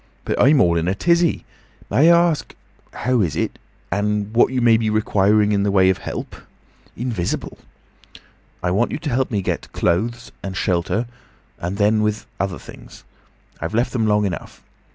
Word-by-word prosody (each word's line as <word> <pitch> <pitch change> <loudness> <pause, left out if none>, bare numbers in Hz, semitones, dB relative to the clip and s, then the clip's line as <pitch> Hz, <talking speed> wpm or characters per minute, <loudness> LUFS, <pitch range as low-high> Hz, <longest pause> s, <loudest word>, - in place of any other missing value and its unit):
"But - - 0
I'm 140 +2 +5
all 85 -1 +3
in 80 - -2
a 95 - 0
tizzy. 170 - +1 0.5
May 160 +5 +5
I 170 0 +5
ask—How 130 -4 -4
is 85 -7 -1
it? - - -2 0.3
And 105 +2 -1
what 120 +2 +4
you 130 - 0
may 120 -2 +5
be 110 -1 0
requiring 105 0 +2
in 100 -1 +2
the 100 - +1
way 95 -1 +4
of 95 - -3
help?—Invisible!" 115 -7 -6 1.0
"I 90 - +1
want 110 +6 +1
you - - -3
to 150 -1 -4
help 130 +2 0
me 100 -4 -1
get - - -3
clothes—and 100 +1 -2
shelter—and 95 0 -3
then, 105 +1 +3
with 105 0 -1
other 95 -2 -2
things. - - -13 0.6
I've 80 +6 -4
left 120 +2 0
them 115 -4 +1
long 105 0 +2
enough. 90 -4 -6
105 Hz, 160 wpm, -21 LUFS, 95-120 Hz, 1.0 s, I'm